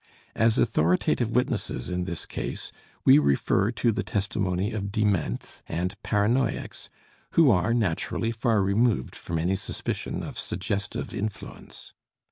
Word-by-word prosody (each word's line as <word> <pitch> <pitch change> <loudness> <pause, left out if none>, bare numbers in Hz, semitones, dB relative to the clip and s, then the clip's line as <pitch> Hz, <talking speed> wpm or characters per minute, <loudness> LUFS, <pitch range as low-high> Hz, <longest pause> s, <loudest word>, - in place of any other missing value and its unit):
As 115 0 +3
authoritative 110 +3 +2
witnesses 125 - 0
in 90 0 -2
this 85 -3 -4
case - - -5 0.3
we - - +8
refer 75 +7 +2
to 120 0 +2
the - - -1
testimony 100 -1 -1
of 100 -3 -3
dements 100 - -1
and 90 +3 -2
paranoiacs, 115 +5 0 0.4
who 160 -6 +6
are, 90 +2 +2
naturally 115 +1 0
far 115 -3 +1
removed 100 - +1
from 85 - -4
any 90 +4 +1
suspicion 95 - -4
of - - -5
suggestive 100 +2 -3
influence. 105 0 -7
100 Hz, 125 wpm, -26 LUFS, 90-115 Hz, 0.4 s, we